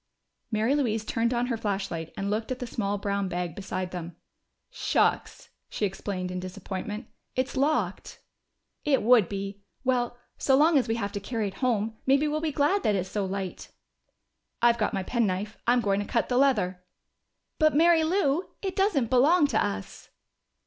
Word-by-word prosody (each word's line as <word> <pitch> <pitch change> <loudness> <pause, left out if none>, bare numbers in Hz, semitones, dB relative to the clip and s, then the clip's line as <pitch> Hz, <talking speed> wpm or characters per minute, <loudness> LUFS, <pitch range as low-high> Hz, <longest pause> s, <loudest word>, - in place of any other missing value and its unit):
Mary 220 +4 +2
Louise 225 -7 0
turned 230 +2 0
on 240 0 +1
her 240 -2 -1
flashlight 195 -6 -3
and 200 +1 -2
looked 220 +3 -2
at 255 - -1
the 250 - -5
small 205 -3 -2
brown 200 -1 -1
bag 175 -2 -3
beside 185 -1 -4
them. 175 -2 -6 0.6
"Shucks!" - - 0 0.2
she 210 - -1
exclaimed 190 -1 -4
in 180 - -3
disappointment. 195 +4 -5 0.3
"It's 255 +1 -1
locked." 290 +4 0 0.6
"It 280 -5 +2
would 230 -5 +5
be. 200 0 -5 0.2
Well, 245 -2 0 0.2
so 265 -1 +4
long 315 +3 +5
as 255 - -1
we 225 - 0
have 205 -3 -2
to 205 - -4
carry 215 0 -2
it - - -12
home, 225 -3 0
maybe 275 +3 +4
we'll 305 +1 -1
be 320 -1 -1
glad 295 +8 +2
that 210 - +2
it's 185 -1 -2
so 205 -1 -1
light." 190 -1 -5 0.9
"I've 235 0 +4
got 210 - +1
my 195 -2 -2
penknife. 210 -2 -1
I'm 245 +1 +4
going 200 -2 +1
to 205 - -2
cut 235 - 0
the 245 - +1
leather." 205 -10 +2 0.8
"But, 310 -2 +4
Mary 330 +1 +5
Lou, 330 -1 +1
it 380 -2 -2
doesn't 360 - +1
belong 295 +6 +5
to 220 - +2
us!" 95 -1 -5
225 Hz, 175 wpm, -27 LUFS, 195-265 Hz, 0.9 s, would